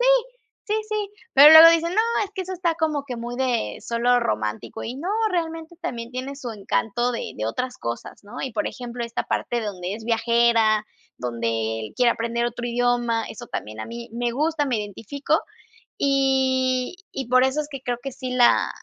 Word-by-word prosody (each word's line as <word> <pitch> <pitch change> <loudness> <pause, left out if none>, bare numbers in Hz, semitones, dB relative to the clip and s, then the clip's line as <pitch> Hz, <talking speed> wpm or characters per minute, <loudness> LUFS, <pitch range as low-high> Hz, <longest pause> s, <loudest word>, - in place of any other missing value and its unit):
Sí, - - +2 0.6
sí, 425 - 0
sí. 425 -2 -2 0.2
Pero 285 +3 +10
luego 325 +1 +11
dicen: 335 +2 +1
"No, 435 - +4 0.2
es 400 - -10
que 380 - -2
eso 370 +1 -6
está 345 -2 0
como 310 -4 -1
que 250 -3 -5
muy 240 +1 -5
de 245 - -1
solo 240 +1 +2
romántico", 110 - -3
y 245 +3 -5
no, 340 +7 -5 0.2
realmente 330 -1 -3
también 240 -9 -5
tiene 260 +2 -5
su 250 -4 -6
encanto 225 +3 -1
de 235 - -4
de 110 0 -2
otras 250 - -3
cosas, 115 0 -6
¿no? 210 +4 -8
Y, 265 - -4
por 210 -1 -1
ejemplo, 245 -1 -6
esta 235 0 -3
parte 240 -1 -1
de 220 - -4
donde 185 -1 -4
es 225 - -9
viajera, 230 -1 +3 0.3
donde 115 -2 -2
él 110 - -8
quiere 245 -2 +4
aprender 235 +1 -2
otro 240 0 -4
idioma, 240 -1 +1
eso - - -9
también 110 +1 -5
a - - -5
mí 235 0 -8
me 240 0 -1
gusta, 300 +2 0
me 255 -3 0
identifico, 210 +7 -2 0.6
y 265 +1 +1 0.2
y 265 -3 -5
por 255 +1 +5
eso 265 +3 +1
es 295 - -5
que 275 -2 -7
creo 245 -1 -2
que 270 -2 -5
sí 255 0 -6
la 245 -1 +4
245 Hz, 200 wpm, -23 LUFS, 230-275 Hz, 0.6 s, luego